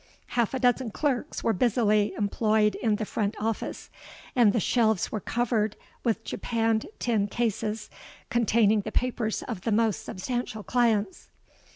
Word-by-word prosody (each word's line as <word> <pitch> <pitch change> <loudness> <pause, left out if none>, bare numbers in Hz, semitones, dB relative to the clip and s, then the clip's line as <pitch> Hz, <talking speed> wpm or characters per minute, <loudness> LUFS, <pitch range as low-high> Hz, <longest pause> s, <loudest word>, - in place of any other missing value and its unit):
Half 240 +1 0
a - - -1
dozen 250 -1 +2
clerks 280 +4 -2
were 225 - +2
busily 210 -1 +2
employed 215 +1 +2
in 220 -3 0
the 215 - -3
front 210 0 -2
office; 220 0 -3 0.4
and 235 -5 +6
the 230 - +1
shelves 220 -1 +2
were 215 - -2
covered 220 -1 0 0.3
with 225 -1 0
japanned 225 -1 -1
tin 220 -4 +1
cases, 220 -1 -2 0.4
containing 220 -2 +3
the 220 - -6
papers 235 -3 -1
of 180 - -5
the 225 - -1
most 220 -1 +1
substantial 220 +1 -4
clients. 220 -5 0
220 Hz, 145 wpm, -27 LUFS, 210-240 Hz, 0.4 s, and